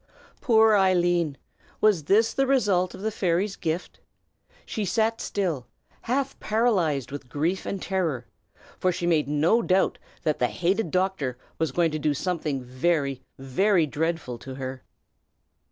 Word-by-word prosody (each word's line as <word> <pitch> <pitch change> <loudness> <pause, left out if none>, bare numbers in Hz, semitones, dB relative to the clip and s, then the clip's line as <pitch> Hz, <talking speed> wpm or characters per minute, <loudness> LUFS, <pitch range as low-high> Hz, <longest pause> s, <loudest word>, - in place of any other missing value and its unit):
Poor 220 -3 +5
Eileen! 175 -6 +2 0.4
Was 200 -8 +3
this 220 +6 +3
the 270 0 +1
result 200 -9 +2
of - - -10
the 220 +1 -1
fairy's 190 +1 0
gift? 165 +3 -4 0.7
She 215 - -3
sat 220 +3 0
still, 165 -11 -2 0.3
half 270 +3 -2
paralyzed 185 - +1
with 140 -3 -7
grief 165 +8 -1
and 195 - -3
terror, 170 -10 -1 0.5
for 185 - +2
she 175 0 -3
made 160 -5 +2
no 155 +10 +3
doubt 190 -3 +1 0.2
that 155 -3 0
the 125 - +3
hated 185 - 0
doctor 180 -8 -1 0.2
was 160 -1 0
going 170 -2 +2
to 155 - -2
do 150 -1 +1
something 150 -5 -2
very, 135 +1 0 0.2
very 165 +7 +2
dreadful 150 -4 -2
to 130 +1 -8
her. 130 -1 -6
175 Hz, 145 wpm, -26 LUFS, 145-200 Hz, 0.7 s, Poor